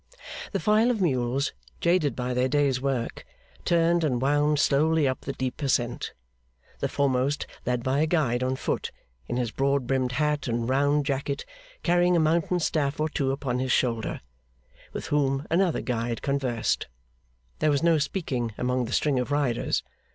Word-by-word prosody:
The - - -1
file 215 +3 +3
of 240 -3 0
mules, 135 -5 0 0.3
jaded 170 -4 +2
by 125 0 -2
their 125 +1 +2
day's 140 -2 +1
work, 135 -4 -2 0.4
turned 170 0 +3
and 130 -6 +1
wound 145 +3 +2
slowly 150 +1 +3
up 130 - -2
the 135 - -4
deep 130 +2 -4
ascent; 125 -4 0 0.7
the - - -1
foremost 140 0 +1 0.2
led 125 -1 0
by 130 +2 +1
a 155 - +3
guide 130 -8 +1
on 130 +1 0
foot, - - -2 0.4
in 120 - -2
his 120 -3 -1
broad 140 0 +1
brimmed 130 -1 0
hat 150 0 0
and 115 -1 -1
round 145 +2 +2
jacket, 140 0 -2 0.4
carrying 175 0 +3
a - - +4
mountain 165 +3 +2
staff 150 -4 0
or 155 +1 +1
two 140 -3 0
upon 135 -2 -2
his 130 0 -1
shoulder, 115 -4 0 0.7
with - - -5
whom 140 -1 +1
another 175 0 +2
guide 115 -1 -2
conversed. 130 -5 0 0.7
There 155 - +3
was 145 +1 +1
no 165 -2 +4
speaking 130 - -2
among 125 0 0
the 115 - -5
string 145 -4 +2
of 125 - -2
riders. 145 -5 0
140 Hz, 165 wpm, -26 LUFS, 125-155 Hz, 0.7 s, a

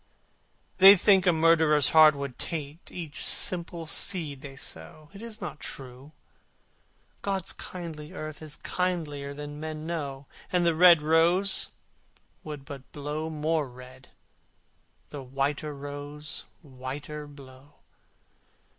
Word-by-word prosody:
They 195 +2 +11
think 190 -1 +4
a - - +7
murderer's 160 -3 +4
heart 155 -2 +7
would 140 -3 -6
taint 155 0 -5
Each 160 -5 -7
simple 170 -2 +2
seed 155 -4 -2
they 140 -2 -9
sow. 140 - -9
It 200 - -11
is 225 -2 -7
not 165 -5 -6
true! 130 +2 -9 1.1
God's 195 -3 -1
kindly 165 -3 -8
earth 155 -4 -7
Is 155 -1 -8
kindlier 150 -6 -2
than 145 0 -7
men 155 0 -5
know, 145 -5 -4 0.3
And 180 -1 +2
the 170 - +4
red 170 -1 +7
rose 170 +5 +4 0.7
would 150 -3 -8
but 135 -1 -10
glow 150 +2 -4
more 155 -2 -1
red, 130 +1 -14 1.0
The 145 - -7
white 135 +3 -1
rose 145 +1 -7 0.2
whiter 145 +2 -7
blow. 140 0 -15
150 Hz, 120 wpm, -27 LUFS, 140-165 Hz, 1.1 s, They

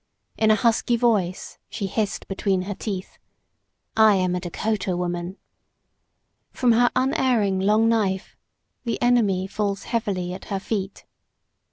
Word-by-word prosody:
In 220 - +2
a 215 - +6
husky 230 +1 +2
voice 215 -7 0
she 210 -1 -4
hissed 205 +1 -2
between 195 -1 0
her 200 +2 -4
teeth, 190 -2 -6 0.8
"I 220 -2 +6
am 185 -1 +1
a 180 - -1
Dakota 185 +1 -2
woman!" 175 +1 -3 1.1
From 250 -2 +2
her 240 +1 +4
unerring 255 -7 +2
long 210 +4 +3
knife 205 -4 0 0.5
the 235 -2 -2
enemy 220 -7 +2
falls 200 0 -2
heavily 190 -6 -2
at 185 - -9
her 195 - -3
feet. 195 -1 -4
205 Hz, 135 wpm, -23 LUFS, 190-225 Hz, 1.1 s, a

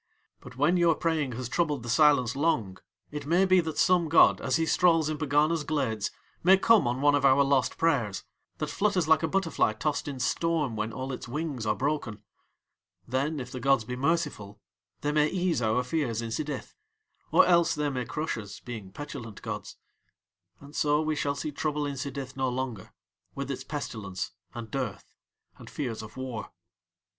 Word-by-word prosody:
But 125 0 -13
when 155 +6 +3
your 170 -2 +4
praying 155 -6 -1
has 125 +1 -4
troubled 150 -3 0
the - - -8
silence 140 -1 +4
long 125 - 0 0.3
it 145 -1 -6
may 175 +4 +4
be 185 -1 +5
that 160 -3 -2
some 175 -3 +3
god 165 - +6
as - - 0
he 165 - +2
strolls 165 -2 +3
in 155 - -3
Pegana's 155 +2 +2
glades 130 -9 -1 0.3
may 190 +3 +7
come 220 - +4
on 125 +2 -1
one 145 0 +5
of 145 -1 +2
our 135 +1 +6
lost 135 -2 +1
prayers, 120 - +1 0.3
that - - -3
flutters 195 -6 +1
like 160 -1 +5
a 160 - +1
butterfly 165 - +1
tossed 145 +8 -2
in 140 -3 -5
storm 150 -1 0
when 110 +1 -2
all 130 +3 -5
its 125 - -7
wings 140 -4 -3
are 105 - +2
broken; 130 -7 -2 0.8
then 140 +5 -1
if 125 -1 -7
the 130 - -5
gods 135 -2 +3
be 125 +3 -5
merciful 135 -8 -1 0.4
they 145 - 0
may 150 0 +3
ease 180 -5 0
our 110 +2 +1
fears 125 -4 -1
in 115 -1 -3
Sidith, 145 +3 -4 0.6
or - - +6
else 170 -2 +4
they 150 -1 -1
may 125 -2 -2
crush 140 +2 -3
us, 100 -2 -9
being 110 -6 -8
petulant 120 -4 -8
gods, - - -6 0.8
and 140 +1 -14
so 150 0 +2
we 155 0 0
shall 140 -1 -1
see 150 - -4
trouble 150 0 -2
in 140 - -3
Sidith 135 -1 -5
no 130 -1 0
longer, 125 -6 -4 0.4
with 140 0 -4
its 130 0 -5
pestilence 105 -10 -5 0.2
and 115 -2 -7
dearth 125 -7 -4 0.5
and - - -11
fears 120 -7 -4
of 110 +2 -11
war." 130 -4 -5
140 Hz, 185 wpm, -28 LUFS, 125-155 Hz, 0.8 s, may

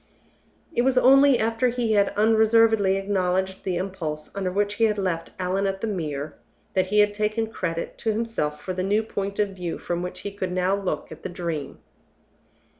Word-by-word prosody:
It 240 - +2
was 260 +1 +2
only 270 +1 +6
after 225 +3 +1
he 240 -2 -1
had 200 -2 +4
unreservedly 220 -2 +4
acknowledged 190 -1 -1
the 185 -2 -1
impulse 170 -5 -4
under 190 -2 -1
which 205 +2 0
he 225 +2 +2
had 210 -1 +1
left 175 -4 -2
Allan 190 +2 0
at 195 0 -3
the - - -1
Mere, 155 -8 -3 0.4
that 185 -1 +1
he 210 +2 +4
had 205 0 +2
taken 215 +2 0
credit 165 -5 -4
to 225 - 0
himself 215 -10 -2
for 185 - -4
the 185 - -2
new 205 +4 +1
point 200 -2 -4
of 210 -1 +1
view 180 -3 -5
from 175 0 -3
which 180 0 -5
he 205 - -5
could 190 -2 -4
now 185 +1 +1
look 190 -7 -3
at 160 - -10
the - - -5
Dream. 165 -6 -4
195 Hz, 190 wpm, -24 LUFS, 180-220 Hz, 0.4 s, only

